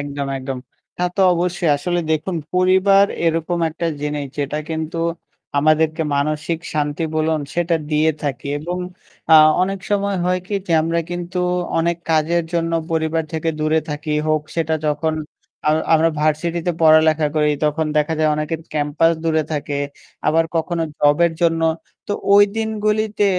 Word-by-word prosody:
একদম, 145 -1 -4
একদম। 130 0 -5 0.4
তা 180 - -1
তো - - +1
অবশ্যই। 175 -1 0
আসলে 175 +5 -1
দেখুন 160 +3 -1 0.2
পরিবার 190 +2 +5 0.2
এরকম 165 +1 0
একটা 165 +2 -3
জিনিস 150 -1 -2
যেটা 145 +1 -2
কিন্তু 160 +1 -3 0.6
আমাদেরকে 155 +2 +2
মানসিক 155 +3 -1 0.2
শান্তি 150 +1 -1
বলুন 155 0 +1
সেটা 175 0 +1 0.2
দিয়ে 155 +1 +3
থাকি। 140 -3 -3
এবং 175 +4 -4 0.5
আ - - +8 0.3
অনেক 195 +1 -1
সময় 200 -1 +1
হয় 180 0 +1
কি? 205 - -4
যে 170 - -1
আমরা 165 +1 0
কিন্তু 175 +1 -4 0.4
অনেক 170 +1 +1
কাজের 160 +2 +2
জন্য 165 -1 0 0.2
পরিবার 160 0 0
থেকে 160 0 -2
দূরে 155 +1 +2
থাকি। 150 +1 -5 0.2
হোক 155 -1 +2
সেটা 160 -1 +1
যখন 155 +1 0 0.5
আমরা 155 +1 +2
আমরা 160 +1 +4
ভার্সিটিতে 165 +3 0
পড় 155 -1 +7
পড়ালেখা 155 -1 +3
করি 150 -1 +3
তখন 155 +1 +1
দেখা 150 +2 +2
যায় 155 -1 +3
অনেকের 155 +1 -3
ক্যাম্পাস 150 +2 +2
দূরে 160 -1 +2
থাকে। 145 -1 -2 0.5
আবার 160 +2 +3
কখনো 165 +1 -1 0.2
জবের 155 +3 +3
জন্য। 165 -1 +2 0.4
তো - - -2 0.2
ঐ - - +8 0.2
দিনগুলিতে 215 -1 0
160 Hz, 150 wpm, -20 LUFS, 150-175 Hz, 0.6 s, আ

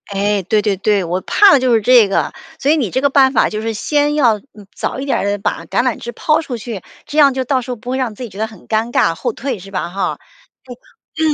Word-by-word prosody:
哎， 200 +1 +1
对 210 +4 +1
对 200 -2 0
对， 200 0 +1
我 175 +2 -2
怕 405 - +5
的 285 - +6
就 255 -2 +2
是 225 - +3
这 240 -1 +6
个， 195 - 0 0.3
所 280 - +2
以 320 - +3
你 245 -9 -1
这 260 - -1
个 280 - +3
办 270 -1 +4
法 - - +3
就 215 0 -4
是 225 0 -2
先 295 +6 0
要 240 -8 +3
嗯， 210 -3 -17
早 265 - -4
一 275 - -4
点 275 - 0
儿 - - -2
地 205 0 0
把 195 - -3
橄 240 - 0
榄 250 -3 0
枝 240 - -7
抛 310 +1 +1
出 260 -6 -5
去， 220 -3 -6 0.2
这 300 - -6
样 280 -3 +6
就 260 0 -2
到 260 0 0
时 250 - -7
候 - - -3
不 245 +2 -10
会 260 - -1
让 250 -5 -2
自 250 - -8
己 235 - -6
觉 195 - -13
得 220 - -1
很 220 -5 -16
尴 225 +2 -1
尬， 165 - +2
后 - - -3
退， 255 -5 -4
是 195 +2 -12
吧 185 -3 -3
哈？ 195 +2 -2 1.0
对， 315 -1 +1
235 Hz, 300 characters per minute, -17 LUFS, 205-270 Hz, 1.0 s, 的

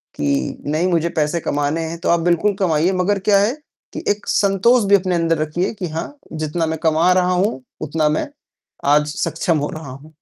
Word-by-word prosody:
कि 70 -1 -1
नहीं 165 +4 +1
मुझे 170 -1 +1
पैसे 150 +2 +1
कमाने 145 +2 -1
हैं, 170 - -5
तो - - -2
आप 170 0 +4
बिल्कुल 175 +4 +2
कमाइए, 170 -1 +2
मगर 190 +2 0
क्या 200 0 +3
है 210 +5 +2 0.4
कि - - -6
एक 205 0 -4
संतोष 205 +4 +3
भी 200 - +7
अपने 185 -2 +1
अंदर 165 -1 +1
रखिए 170 +7 -1
कि 185 -4 -5
हाँ, 165 - -5 0.2
जितना 155 +1 -2
मैं 160 0 -2
कमा 160 +3 +3
रहा 180 0 +2
हूँ, 180 - 0 0.2
उतना 155 0 0
मैं 155 - -1 0.7
आज 150 0 +2
सक्षम 165 0 0
हो 145 0 -2
रहा 155 -3 -8
हूँ। 150 +4 -13
170 Hz, 200 wpm, -19 LUFS, 155-185 Hz, 0.7 s, भी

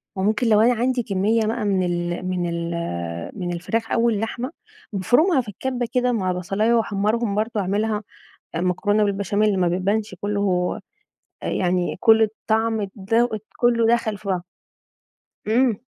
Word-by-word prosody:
وممكن 215 +5 +1
لو 215 -1 +5
أنا 245 +2 +5
عندي 245 +1 0
كمية 215 +3 +1
بقى 225 0 -1
من 190 -2 +2
ال 175 0 -2
من 180 -2 -1
ال 170 0 -3 0.7
من 175 -1 -2
الفراخ 225 +6 -2
أو 235 0 +3
اللحمة، 230 +5 -2 0.4
بافرمها 260 - +3
في 235 - -14
الكبة 245 +4 -3
كده 250 0 +2
مع 190 -6 0
بصلاية 195 +6 0
واحمرهم 215 0 +1
برضو، 215 0 -1
أعملها 210 +2 0 0.5
مكرونة 205 +4 +1
بالبشاميل 200 0 +1
ما 175 - +3
بيبانش 195 +3 -1
كلّه 200 -3 0 0.6
يعني 180 -1 0
كل 225 -1 +6
الطعم 220 0 0
ده 225 +4 +1 0.3
كلّه 235 -2 +3
دخل 220 -3 0
في 200 - -12
بعضه. 180 -2 -1 1.0
امم، 235 +2 +3
210 Hz, 140 wpm, -22 LUFS, 185-230 Hz, 1.0 s, كل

